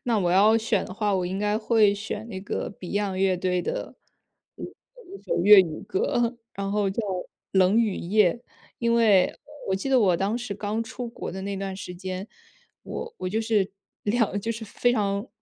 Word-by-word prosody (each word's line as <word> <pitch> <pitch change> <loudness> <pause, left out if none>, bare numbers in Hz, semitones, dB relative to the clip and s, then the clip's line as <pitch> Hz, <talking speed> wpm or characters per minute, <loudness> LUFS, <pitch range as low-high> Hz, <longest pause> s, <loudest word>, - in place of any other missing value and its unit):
那 235 -3 +1
我 175 -3 +1
要 210 +5 +5
选 220 -3 0
的 - - -8
话， 205 0 0
我 185 -1 0
应 190 +2 -3
该 210 +1 +1
会 215 -2 +3
选 210 +1 -5
那 190 -4 -6
个 200 - -4
Beyond 195 +1 -2
乐 190 -1 +2
队 180 0 0
的， - - -4 0.6
呃， - - -7 0.4
一 390 +1 -11
首 - - -1
粤 205 -1 +10
语 165 -4 -3
歌， 250 - 0 0.2
然 195 0 -3
后 205 -2 +1
叫 210 +4 -2 0.5
《冷 190 +3 +4
雨 220 -4 +2
夜》。 185 0 +3 0.4
因 235 -1 +1
为， 210 -6 +5
呃， - - -11 0.3
我 190 - +2
记 195 - -4
得 265 -1 +4
我 185 -5 +4
当 195 +5 0
时 240 -4 -4
刚 210 +2 -2
出 245 +1 -6
国 230 - -6
的 190 +1 -6
那 200 0 -3
段 195 0 -4
时 180 -2 -7
间， 185 +1 -5 0.6
我 470 0 -6
我 185 - -3
就 215 +4 -1
是， 215 -4 +1 0.3
两 210 -1 +1
就 225 - -3
是 225 0 -7
非 245 +3 +1
常 200 -1 -1
205 Hz, 235 characters per minute, -25 LUFS, 190-225 Hz, 0.6 s, 粤